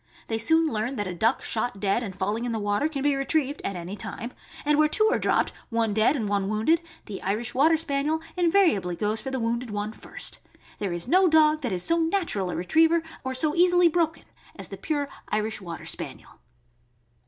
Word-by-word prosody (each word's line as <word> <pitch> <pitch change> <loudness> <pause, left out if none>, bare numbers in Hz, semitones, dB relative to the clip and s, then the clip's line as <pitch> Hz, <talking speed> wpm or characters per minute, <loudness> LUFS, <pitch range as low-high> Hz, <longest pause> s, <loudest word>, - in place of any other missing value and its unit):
They 225 -1 -1
soon 320 +8 +3
learn 230 0 -2
that 205 - -2
a 180 - -4
duck 225 +8 +1
shot 220 -2 -2
dead 200 +3 +1
and 200 -6 -6
falling 205 +5 -2
in 245 - -2
the 225 - -1
water 205 +8 0
can 280 -3 -4
be 290 0 +3
retrieved 285 +1 0
at 195 - -3
any 175 +3 -6
time, 235 +3 -6 0.3
and 300 0 +3
where 305 - +5
two 430 +8 +3
are - - +1
dropped, - - +1 0.2
one 230 -3 0
dead 220 +7 +3
and 225 -7 -2
one 200 -1 0
wounded, 225 +11 +2 0.2
the 200 - -7
Irish 215 +5 -2
Water 315 +5 +4
Spaniel 305 0 0 0.2
invariably 335 - +2
goes 210 +4 -1
for 265 - -5
the 265 -1 -2
wounded 235 +1 -2
one 210 +1 -3
first. - - -4 0.4
There 200 -3 -2
is 175 +3 -3
no 370 +6 +5
dog 310 -1 +4
that 245 -6 -2
is 180 -1 -1
so 335 0 +2
natural 325 - 0
a - - -3
retriever 320 - +3 0.2
or 260 -1 -3
so 300 +3 +2
easily 355 0 +5
broken 325 -1 0 0.3
as - - -8
the - - -7
pure 290 -3 -2 0.2
Irish 215 0 -2
Water 170 -3 -7
Spaniel. - - -4
245 Hz, 210 wpm, -26 LUFS, 205-315 Hz, 0.4 s, where